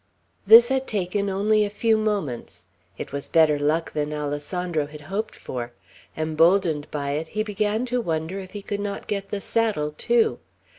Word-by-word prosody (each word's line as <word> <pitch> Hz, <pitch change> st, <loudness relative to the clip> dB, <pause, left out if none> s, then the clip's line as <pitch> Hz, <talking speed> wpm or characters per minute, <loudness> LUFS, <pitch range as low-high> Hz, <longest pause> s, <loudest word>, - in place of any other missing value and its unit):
This 230 Hz, +3 st, +9 dB
had 265 Hz, 0 st, 0 dB
taken 200 Hz, 0 st, -1 dB
only 210 Hz, +2 st, +2 dB
a 205 Hz, -, -1 dB
few 220 Hz, +2 st, +2 dB
moments. 155 Hz, -, -3 dB, 0.3 s
It -, -, -6 dB
was 140 Hz, 0 st, -4 dB
better 155 Hz, -3 st, +4 dB
luck 155 Hz, +3 st, 0 dB
than 150 Hz, 0 st, -2 dB
Alessandro 150 Hz, +2 st, -2 dB
had 150 Hz, 0 st, -11 dB
hoped 195 Hz, +8 st, -4 dB
for; 120 Hz, -1 st, -6 dB, 0.4 s
emboldened 160 Hz, 0 st, +2 dB
by 140 Hz, -1 st, -3 dB
it, 155 Hz, +3 st, -2 dB
he 215 Hz, -, +2 dB
began 210 Hz, +2 st, -1 dB
to 250 Hz, 0 st, -1 dB
wonder 165 Hz, 0 st, -2 dB
if 185 Hz, -1 st, -10 dB
he 205 Hz, -1 st, -6 dB
could 205 Hz, 0 st, -3 dB
not 205 Hz, -1 st, -4 dB
get 200 Hz, -1 st, -3 dB
the 205 Hz, -, -3 dB
saddle 205 Hz, -9 st, 0 dB
too. 455 Hz, -, +2 dB
185 Hz, 170 wpm, -24 LUFS, 150-210 Hz, 0.4 s, This